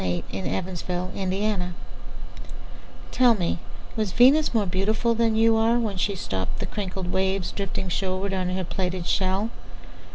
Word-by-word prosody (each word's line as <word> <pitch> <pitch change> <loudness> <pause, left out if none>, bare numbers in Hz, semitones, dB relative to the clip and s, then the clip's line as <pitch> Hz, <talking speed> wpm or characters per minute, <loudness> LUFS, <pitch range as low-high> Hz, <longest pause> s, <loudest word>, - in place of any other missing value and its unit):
Venus 90 -1 -1
Transiens 175 - -3
By 180 0 -2
Amy 190 +1 -1
Lowell 190 -4 0 1.4
TELL 245 -2 +5
me, 170 - -1 0.4
Was 215 -4 -1
Venus 275 +6 +6
more 220 -4 +2
beautifulThan 220 +4 +1
you 225 0 +5
are, 225 +2 +3
When 215 -5 -1
she 200 +3 +1
stoppedThe 95 - -3
crinkled 190 -3 -4
waves, 190 0 0
Drifting 195 -1 -3
shorewardOn 185 0 -1
her 190 - -1
plaited 180 0 -3
shell? 195 +5 +1
190 Hz, 135 wpm, -25 LUFS, 180-220 Hz, 1.4 s, Venus